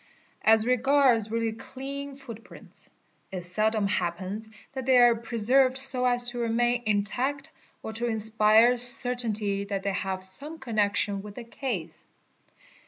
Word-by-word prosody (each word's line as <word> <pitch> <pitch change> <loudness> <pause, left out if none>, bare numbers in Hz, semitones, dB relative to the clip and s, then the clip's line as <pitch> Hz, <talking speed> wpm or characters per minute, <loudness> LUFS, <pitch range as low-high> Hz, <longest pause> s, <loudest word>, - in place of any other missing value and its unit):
As 220 0 +4
regards 250 -3 +2
really 230 0 -1
clean 275 +4 -8
footprints, 235 -5 -12 0.4
it 185 -2 -6
seldom. 215 +4 0
happens 190 +3 -3 0.2
that 265 -2 -6
they 260 -1 +5
are 240 -1 +6
preserved 245 +3 +1
so 265 -1 -1
as 245 0 +1
to 245 - -6
remain 240 +1 0
intact, 245 +7 -1 0.3
or 220 - -6
to 235 +2 -1
inspire 220 +2 +3
certainty 230 -5 +2
that 195 -1 -4
they 200 - -1
have 190 0 -3
some 280 +13 -3
connection 210 -5 -1
with 205 0 -11
the 245 - -8
case. 230 - -6
230 Hz, 135 wpm, -26 LUFS, 205-250 Hz, 0.4 s, are